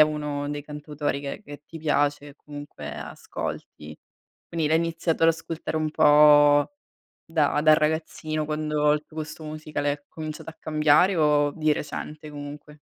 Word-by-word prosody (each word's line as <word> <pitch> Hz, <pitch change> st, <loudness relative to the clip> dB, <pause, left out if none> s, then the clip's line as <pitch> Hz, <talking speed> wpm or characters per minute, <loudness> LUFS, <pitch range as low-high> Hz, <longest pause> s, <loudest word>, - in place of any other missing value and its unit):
uno 150 Hz, -1 st, -1 dB
dei 145 Hz, 0 st, -4 dB
cantautori 150 Hz, -1 st, -4 dB
che 140 Hz, -1 st, -6 dB
che 145 Hz, +1 st, -10 dB
ti 165 Hz, -, -10 dB
piace 145 Hz, -1 st, 0 dB
e 140 Hz, -, -14 dB
comunque 145 Hz, -1 st, -9 dB
ascolti. 75 Hz, 0 st, -7 dB, 0.5 s
Quindi 165 Hz, -2 st, -1 dB
l'hai 160 Hz, +1 st, +3 dB
iniziato 165 Hz, 0 st, -1 dB
ad 165 Hz, -, +7 dB
ascoltare 165 Hz, -1 st, -2 dB
un 155 Hz, 0 st, 0 dB
po' 145 Hz, -, +6 dB, 0.5 s
da 155 Hz, -3 st, +1 dB
da 155 Hz, 0 st, +6 dB
ragazzino 155 Hz, 0 st, -1 dB
quando 150 Hz, -1 st, 0 dB
il 150 Hz, 0 st, -1 dB
tuo 155 Hz, -, -12 dB
gusto 155 Hz, +1 st, -6 dB
musicale 150 Hz, -1 st, -3 dB
è 145 Hz, 0 st, -8 dB
cominciato 155 Hz, 0 st, -7 dB
a 165 Hz, -, -9 dB
cambiare 155 Hz, +4 st, +3 dB
o 150 Hz, -2 st, +3 dB
di 155 Hz, -1 st, +1 dB
recente, 150 Hz, +1 st, -6 dB
comunque? 145 Hz, +1 st, -9 dB
150 Hz, 155 wpm, -25 LUFS, 145-155 Hz, 0.5 s, ad